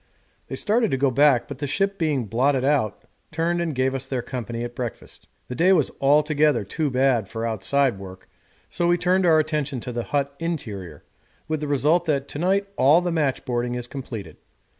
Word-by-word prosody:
They - - -5
started 225 +1 +1
to 135 - 0
go 135 0 +2
back, 140 -1 +4
but 140 -2 -8
the 145 - -2
ship 195 +7 -1
being 150 -7 0
blotted 130 +5 +1
out, 140 -7 0 0.3
turned 170 +2 0
and 165 -4 -2
gave 130 +1 +1
us 135 0 -4
their 130 -3 -2
company 120 -2 -5
at 120 0 -5
breakfast. 120 -2 -7 0.2
The - - -5
day 180 +8 +4
was 155 -7 +2
altogether 150 -1 +3
too 150 +9 -2
bad 130 -5 +2
for 115 +3 -4
outside 115 +2 0
work, 95 -1 -11 0.4
so 175 - -1
we 175 0 +3
turned 180 +1 +2
our 160 -2 +6
attention 150 -4 -1
to 125 - -5
the 120 -1 -3
hut 140 -1 -1
interior, 105 - -5 0.4
with 155 0 -1
the 150 - -4
result 150 +5 +2
that 140 -3 0
to 145 - -6
night 195 +3 +1
all 150 +6 +5
the 175 -1 -2
matchboarding 130 -6 -1
is 120 - -4
completed. 125 -5 -8
140 Hz, 195 wpm, -23 LUFS, 125-160 Hz, 0.4 s, our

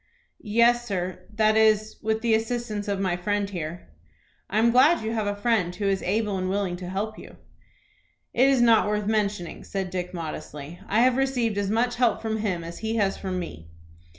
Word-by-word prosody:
"Yes, 240 +1 +4
sir; 185 -3 -4
that 215 0 +3
is, 215 -1 +3
with 220 +1 -1
the 230 -1 +2
assistance 225 -2 -1
of 200 -1 -1
my 185 -3 0
friend 205 +3 -1
here." 170 - -6 0.6
"I 205 - -1
am 230 +2 +4
glad 260 +5 +5
you 220 - -2
have 215 -2 -1
a 205 - -1
friend 205 -5 0
who 205 - -3
is 195 -1 +1
able 205 0 0
and 185 0 -2
willing 195 -2 -1
to 180 0 -7
help 210 +3 -3
you." - - -12 1.0
"It 255 +3 +4
is 260 -3 +4
not 230 -3 +5
worth 210 0 -1
mentioning," 205 -5 -1
said 190 -2 -4
Dick, 180 -1 -3
modestly. 160 -1 -7
"I 215 +3 +2
have 255 0 +4
received 245 -6 0
as 200 -1 -1
much 240 +3 +1
help 245 -2 +2
from 220 -1 -2
him 195 -6 -2
as 170 +1 -8
he 220 0 -2
has 200 -3 +1
from 185 -2 -4
me." 80 - -7
210 Hz, 200 wpm, -25 LUFS, 185-225 Hz, 1.0 s, glad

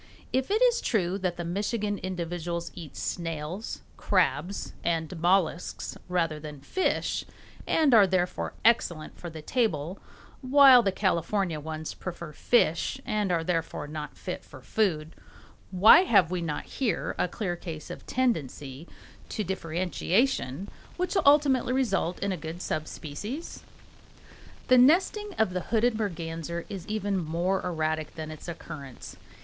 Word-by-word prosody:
If 260 0 +1
it 435 +4 +3
is 485 -1 +4
true 195 -4 0
that 180 -2 -2
the 175 - -4
Michigan 205 +3 -1
individuals 170 -2 -4
eat 165 -6 -10
snails, 165 +4 -4 0.2
crabs, 195 +3 0
and 165 0 -1
mollusks 175 -1 +1
rather 165 -4 0
than 150 -1 -8
fish, 375 - 0 0.4
and 305 -5 +3
are 210 -4 +8
therefore 180 -1 -1
excellent 170 -9 +2
for 175 - -6
the 160 -1 -9
table, 185 - -1 0.4
while 265 -1 +8
the 200 -4 +1
California 185 -2 0
ones 155 +1 -5
prefer 170 -3 -7
fish 235 - +2
and 210 -3 0
are 165 -2 +1
therefore 165 -3 -2
not 150 0 -6
fit 180 - -5
for 130 - -13
food, 160 - 0 0.6
why 190 +3 +8
have 200 - +4
we 180 -1 -1
not 155 -3 -3
here 235 -10 -1
a - - +2
clear 180 -1 -3
case 165 -3 -7
of - - -9
tendency 155 - -2 0.4
to 215 - -2
differentiation 185 - 0 0.3
which 360 +1 -1
will 385 - +3
ultimately 280 -4 +5
result 245 -9 0
in 200 - 0
a 185 - -2
good 160 +2 -6
sub 155 -3 -2
species? 205 - -6 1.1
The 255 0 +7
nesting 375 - +3
of 220 -4 +2
the 180 - -1
hooded 235 +1 +3
merganser 170 -3 -3
is 195 -3 -7
even 205 -2 -1
more 170 +4 0
erratic 155 -3 -2
than 155 -1 -6
its 155 - -10
occurrence. 140 -6 -8
180 Hz, 145 wpm, -28 LUFS, 160-220 Hz, 1.1 s, are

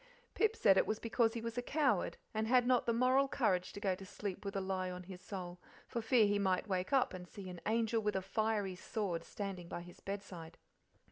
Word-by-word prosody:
Pip 440 0 +2
said 195 - +5
it - - +4
was 215 - 0
because 230 0 +1
he 230 - -2
was 230 +1 -3
a - - 0
coward, 265 - +1 0.2
and 220 0 0
had 250 +1 +5
not 250 -1 +3
the - - +4
moral 255 +4 +4
courage 185 -9 +1
to - - -6
go 195 -2 +1
to 185 - -8
sleep 195 0 -5
with 200 0 -4
a - - +1
lie 190 -1 -1
on 180 0 -6
his 180 0 -10
soul, 180 -2 -6 0.3
for 235 - -3
fear 225 0 +5
he 205 0 +2
might 190 +1 +1
wake 185 +1 -1
up 270 -6 +3
and 180 -1 -7
see 195 +1 -9
an 180 -2 -8
angel 225 0 +2
with 210 -1 0
a 190 - +1
fiery 210 -1 0
sword 180 -3 -3
standing 195 -4 -5
by 175 - -5
his 175 0 -12
bedside. 190 -5 -7
200 Hz, 230 wpm, -36 LUFS, 185-230 Hz, 0.3 s, said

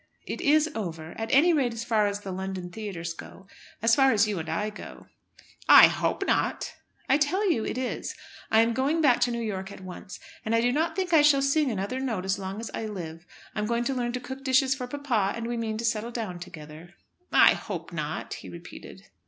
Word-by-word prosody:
"It - - -5
is 305 +2 +4
over, 165 - -5
at 225 - -3
any 325 +6 +5
rate 255 -6 +1
as 230 - -4
far 220 -3 +2
as 205 0 -3
the 195 - -6
London 185 -1 -5
theatres 180 -5 -5
go, 190 +3 -12 0.4
as 230 0 +4
far 270 +2 +5
as 215 0 +3
you 205 -4 -2
and 160 0 -5
I 210 +7 -1
go. 210 - -11 0.6
"I - - +11
hope - - -1
not." - - 0 0.3
"I 270 - +4
tell 370 +7 +2
you 225 -8 0
it - - -3
is. 255 -1 -3 0.3
I 220 - +5
am 230 +1 +2
going 275 +6 +1
back 265 -6 +4
to 245 - +2
New 235 0 -2
York 195 -3 -4
at - - -11
once, 185 0 -9 0.2
and 220 +1 0
do 245 +1 +2
not 315 +5 0
think 370 -2 -2
I 315 - +7
shall 285 -2 +5
sing 275 +1 +2
another 205 +3 -2
note 225 -8 -2
as 190 +1 0
long 195 +2 -5
as 230 - -6
I 220 - -3
live. 170 -5 -7 0.3
I'm 210 0 -2
going 235 +1 0
to 270 - -1
learn 240 -2 -1
to 250 - -2
cook 265 +2 -8
dishes 265 0 +3
for 255 -2 -5
papa, 245 -8 0
and 230 - -4
we 240 +1 -2
mean 225 -2 -2
to 230 - -3
settle 230 0 0
down 220 -7 -5
together." 160 0 -11 0.4
"I - - +7
hope - - -6
not," - - -4
he - - -9
repeated. - - -11
230 Hz, 225 wpm, -27 LUFS, 195-265 Hz, 0.6 s, I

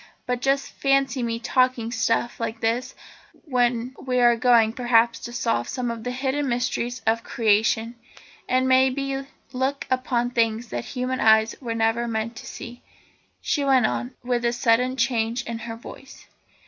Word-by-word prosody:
But 250 -1 -2
just 275 +1 0
fancy 275 -1 +1
me 230 -1 -1
talking 255 -2 +1
stuff 230 0 0
like 230 0 -3
this 230 +3 -1 0.5
when 245 -3 0
we 255 -1 -1
are 240 -1 +5
going, 230 -2 +4
perhaps, 235 -1 +2
to 240 - -7
solve 230 - -1
some 250 -2 -2
of 230 -1 -7
the 250 - -3
hidden 265 +2 -1
mysteries 245 0 -2
of 225 +1 +1
Creation, 225 +1 +1 0.6
and, 255 +1 +2
may 260 0 +5
be, 275 +1 -3 0.3
look 265 +2 -1
upon 245 -1 0
things 230 -1 0
that - - -4
human 255 +2 -3
eyes 220 0 +4
were 230 -3 -3
never 225 +1 +1
meant 225 +1 -3
to - - -9
see," 240 0 -9 0.6
she 290 - 0
went 265 -3 +4
on, 120 0 -2
with 245 -1 -1
a 235 0 +1
sudden 245 +2 +2
change 235 -1 0
in 230 -1 -5
her 225 0 -6
voice. 260 +3 -12
240 Hz, 165 wpm, -24 LUFS, 230-255 Hz, 0.6 s, are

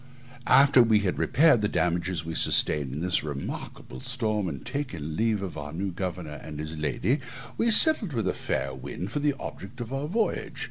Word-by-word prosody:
After 135 -2 +6
we 110 -3 +4
had 95 -3 -2
repaired 150 -6 +4
the 105 - +1
damages 90 -2 -1
we 80 - -5
sustained 70 -4 +3
in 75 +4 -5
this 90 0 +1
remarkable 70 -3 -7
storm, 110 -6 -1
and 70 -5 -8
taken 85 - -4
leave 110 -1 0
of 95 - -5
the 75 0 -7
new 95 +3 -3
governor 90 -4 -5
and 75 -1 -8
his 80 +1 -5
lady, 75 - -1 0.4
we 230 - +1
sailed 230 - +6
with 115 -7 -2
a 90 - +1
fair 65 0 -3
wind 90 +8 -7
for - - -2
the 145 -1 +1
object 100 +7 -9
of 120 +1 -6
our 135 +2 -3
voyage. 215 +6 -2
95 Hz, 190 wpm, -26 LUFS, 80-125 Hz, 0.4 s, After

